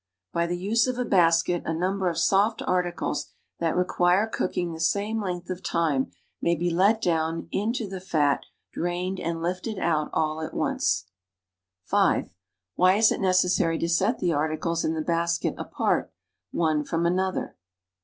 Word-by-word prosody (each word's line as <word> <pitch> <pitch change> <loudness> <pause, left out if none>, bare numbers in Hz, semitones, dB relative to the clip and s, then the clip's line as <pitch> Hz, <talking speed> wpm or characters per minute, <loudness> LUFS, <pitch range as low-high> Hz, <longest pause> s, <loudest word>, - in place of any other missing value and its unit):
By 170 0 +1
the 175 +1 -2
use 220 +6 +2
of 255 -1 -2
a 250 - -1
basket 175 -3 +3
a - - -5
n 165 - 0
u 165 - -3
m 195 +2 -1
ber 185 -2 +1
of 165 - -4
soft 200 +6 +2
articles 175 -4 -1 0.3
that 165 0 0
re 180 - +4
q - - -10
u 175 - +4
i 175 0 +6
r 205 +3 +2
e - - -11
cooking 175 -2 -1
the 160 - -8
same 205 +6 0
length 180 -2 -4
of 185 0 -5
time 160 -6 0 0.3
may 170 0 +2
be 175 +2 -1
let 200 +6 +3
down 165 -1 0
in 210 +3 0
to 235 -4 -3
the 190 -1 -6
fat, 150 -6 +2
SCOTCH - - -19 0.3
BOWL. - - -5
drained 180 +2 -2
and 165 0 -3
lifted 185 +5 -3
out 155 -4 0
all 155 0 -1
at 160 - -6
once. - - 0 0.8
29 - - +3
(5) - - -16
^^ - - -25 0.5
hy - - +1
i 185 +2 +6
S 220 0 +5
it - - -2
liece.ssai\>' 180 -3 +2
to 170 - -1
set 195 +8 +2
the 175 -2 0
articles 155 +3 -1
in 160 - 0
the 160 - -1
basket 170 +1 0
apart, - - -1 0.4
one 155 -3 +1
from 165 +3 -1
another? 185 +2 -1
175 Hz, 210 wpm, -26 LUFS, 165-190 Hz, 0.8 s, i